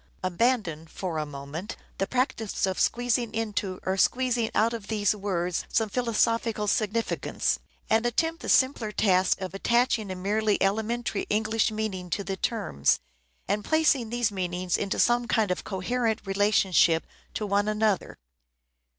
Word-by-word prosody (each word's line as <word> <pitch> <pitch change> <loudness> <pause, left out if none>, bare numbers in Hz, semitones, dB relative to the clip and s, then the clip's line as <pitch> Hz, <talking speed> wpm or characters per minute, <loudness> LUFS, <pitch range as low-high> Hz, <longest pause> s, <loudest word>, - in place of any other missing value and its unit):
Abandon 185 -4 0
for 165 -1 -4
a 150 - -3
moment 145 +7 -7 0.2
the 195 - 0
practice 250 -6 -1
of 190 -1 -2
squeezing 240 -1 +1
into 205 -4 -2
or 190 +1 0
squeezing 245 +1 +2
out 225 +2 +3
of 220 -4 -6
these 210 -1 +1
words 180 -4 -2
some 220 -2 +1
philosophical 230 -1 0
significance, 215 +1 0 0.3
and 225 +1 +3
attempt 325 +8 0
the - - -5
simpler 260 -5 +3
task 185 -3 +2
of 185 0 -4
attaching 235 0 +1
a 185 - -4
merely 205 +3 +1
elementary 220 +2 -1
English 220 +1 +1
meaning 215 -4 -4
to 200 +4 -2
the 195 0 -3
terms, 190 - 0 0.5
and 205 +2 0
placing 295 -6 +2
these 240 -2 0
meanings 180 -2 -2
into 200 - -1
some 240 0 +3
kind 215 -5 +1
of 180 - -2
coherent 220 +3 -1
relationship 195 -4 +3 0.3
to 215 - -2
one 205 +1 +1
another. 215 -2 0
210 Hz, 145 wpm, -27 LUFS, 190-230 Hz, 0.5 s, out